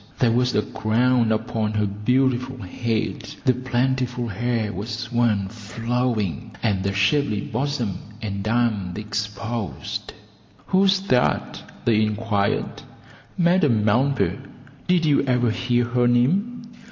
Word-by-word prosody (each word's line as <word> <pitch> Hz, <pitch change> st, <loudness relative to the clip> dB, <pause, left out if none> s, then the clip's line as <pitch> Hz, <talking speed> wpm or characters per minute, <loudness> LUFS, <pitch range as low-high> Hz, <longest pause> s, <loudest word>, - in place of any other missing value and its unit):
There 120 Hz, -3 st, +3 dB
was 125 Hz, +1 st, +1 dB
a 105 Hz, -, +3 dB
crown 115 Hz, +1 st, +1 dB
upon 110 Hz, 0 st, -1 dB
her 105 Hz, -1 st, +1 dB
beautiful 125 Hz, +5 st, 0 dB
head, 110 Hz, 0 st, -3 dB
the 130 Hz, -, +5 dB
plentiful 125 Hz, -1 st, -1 dB
hair 115 Hz, +1 st, -1 dB
was 115 Hz, +5 st, -5 dB
worn 115 Hz, -5 st, +2 dB
flowing, 115 Hz, 0 st, -2 dB
and 100 Hz, -5 st, +1 dB
the 100 Hz, +1 st, -1 dB
shapely 100 Hz, +3 st, +1 dB
bosom 120 Hz, -6 st, -2 dB, 0.2 s
and 100 Hz, -3 st, -4 dB
arms 110 Hz, -6 st, 0 dB
exposed. 105 Hz, -1 st, -4 dB, 0.5 s
"Who's 190 Hz, 0 st, +3 dB
that?" 125 Hz, -10 st, +1 dB, 0.2 s
they 110 Hz, -2 st, +4 dB
inquired. 105 Hz, -1 st, -1 dB, 0.6 s
"Madame 165 Hz, -, +3 dB
Melba; 130 Hz, +6 st, +2 dB, 0.5 s
did 180 Hz, -2 st, +3 dB
you 145 Hz, -2 st, +4 dB
ever 125 Hz, -3 st, +2 dB
hear 120 Hz, +1 st, +1 dB
her 120 Hz, 0 st, +2 dB
name?" 190 Hz, -, +1 dB
120 Hz, 115 wpm, -23 LUFS, 105-125 Hz, 0.6 s, the